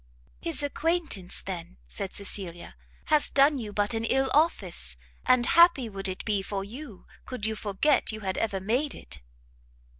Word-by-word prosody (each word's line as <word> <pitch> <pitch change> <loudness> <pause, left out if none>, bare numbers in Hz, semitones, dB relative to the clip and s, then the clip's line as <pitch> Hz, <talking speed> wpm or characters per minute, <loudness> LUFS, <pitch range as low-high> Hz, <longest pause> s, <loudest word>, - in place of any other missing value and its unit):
"His 325 -4 -2
acquaintance, 305 - -1
then," 175 - -6
said 190 - -2
Cecilia, 190 -4 -3 0.4
"has 300 - +4
done 280 0 +4
you 215 -3 -5
but 205 +2 0
an 225 0 -1
ill 265 +3 +1
office, 185 - +1 0.3
and 255 -1 +5
happy 340 -3 +6
it 220 - -8
would 195 -1 -3
be 205 -3 +1
for 195 0 -3
you 230 0 -9 0.2
could 250 -5 -4
you 220 - 0
forget 215 +9 +1
you 215 0 -7
had 190 -2 -2
ever 205 -4 -1
made 245 +10 0
it." 70 - -8
215 Hz, 160 wpm, -28 LUFS, 195-280 Hz, 0.4 s, happy